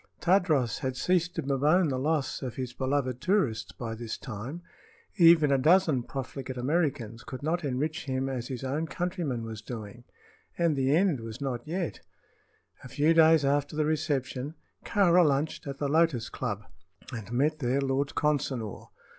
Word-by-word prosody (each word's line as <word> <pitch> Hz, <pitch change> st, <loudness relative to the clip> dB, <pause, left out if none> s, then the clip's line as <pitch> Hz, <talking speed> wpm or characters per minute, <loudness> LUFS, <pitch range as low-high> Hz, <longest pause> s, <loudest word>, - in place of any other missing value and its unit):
Tadros 170 Hz, -, +2 dB
had 130 Hz, -3 st, -3 dB
ceased 180 Hz, +1 st, +1 dB
to -, -, -2 dB
bemoan 145 Hz, +6 st, +3 dB
the 130 Hz, -2 st, -1 dB
loss 150 Hz, 0 st, -1 dB
of 130 Hz, -3 st, -5 dB
his 130 Hz, -2 st, -4 dB
beloved 130 Hz, -1 st, -1 dB
tourists 170 Hz, -, +1 dB
by 115 Hz, -2 st, -5 dB
this 115 Hz, 0 st, -5 dB
time. 125 Hz, +9 st, -7 dB, 0.5 s
Even 165 Hz, -4 st, +6 dB
a 135 Hz, -, +3 dB
dozen 160 Hz, -2 st, +4 dB
profligate 130 Hz, 0 st, -6 dB
Americans 125 Hz, -5 st, -1 dB
could 130 Hz, +1 st, -8 dB
not 170 Hz, +3 st, 0 dB
enrich 150 Hz, +5 st, -2 dB
him 130 Hz, -1 st, -1 dB
as 125 Hz, -3 st, -3 dB
his 130 Hz, -1 st, -5 dB
own 145 Hz, +5 st, -2 dB
countryman 170 Hz, -, -3 dB
was 110 Hz, -1 st, -6 dB
doing. 115 Hz, 0 st, -8 dB, 0.5 s
And 170 Hz, -3 st, +2 dB
the 135 Hz, +1 st, +2 dB
end 175 Hz, -6 st, +2 dB
was 115 Hz, +1 st, -7 dB
not 130 Hz, -2 st, -4 dB
yet. 175 Hz, +1 st, -3 dB, 0.8 s
A -, -, -8 dB
few 150 Hz, +5 st, +2 dB
days 160 Hz, -2 st, +6 dB
after 145 Hz, +2 st, +1 dB
the 155 Hz, 0 st, +1 dB
reception 145 Hz, -2 st, -1 dB, 0.3 s
Kāra 180 Hz, -3 st, +4 dB
lunched 145 Hz, 0 st, 0 dB
at 140 Hz, 0 st, -5 dB
the 145 Hz, -, -1 dB
Lotus 150 Hz, -6 st, +2 dB
Club 105 Hz, 0 st, -4 dB, 0.5 s
and 110 Hz, -2 st, -6 dB
met 150 Hz, +6 st, +1 dB
there 130 Hz, 0 st, +1 dB
Lord 135 Hz, +1 st, -1 dB
Consinor. 135 Hz, -8 st, -1 dB
140 Hz, 165 wpm, -28 LUFS, 125-160 Hz, 0.8 s, Even